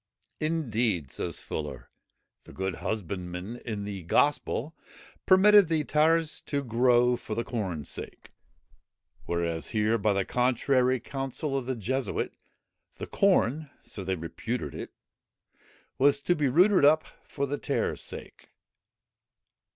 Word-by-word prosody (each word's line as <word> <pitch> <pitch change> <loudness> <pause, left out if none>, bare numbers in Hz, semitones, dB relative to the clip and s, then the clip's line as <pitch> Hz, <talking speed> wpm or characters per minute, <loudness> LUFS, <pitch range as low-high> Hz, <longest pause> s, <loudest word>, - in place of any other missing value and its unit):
"Indeed," 120 - 0
says - - -4
Fuller, 70 -5 -6 0.5
"the - - -13
good 95 -2 -3
husbandman 90 +1 -4
in 110 -4 -5
the 100 -2 -5
Gospel, 145 - +1 0.5
permitted 200 0 +7
the 160 -2 +1
tares 155 +2 +2
to 140 -1 -1
grow 125 0 +3
for 110 -2 -6
the 115 - -1
corne's 95 - -4
sake; - - -8 1.0
whereas 85 -1 -1
here, 110 +1 +1
by 105 -2 +2
the 100 -1 0
contrary 125 +1 +2
counsel 135 +3 -4
of 130 -2 -2
the 130 - -1
Jesuit, 130 +4 -2 0.6
the - - -6
corn 155 - +2
(so 100 - -8
they 95 0 -1
reputed 105 +8 -4
it,) - - -7 1.1
was 140 +1 +4
to 175 - +2
be 150 -3 +1
rooted 180 +7 +4
up 155 +2 +5 0.2
for 140 - -3
the 145 +1 -3
tares' - - -1
sake." - - -8
125 Hz, 130 wpm, -28 LUFS, 100-145 Hz, 1.1 s, permitted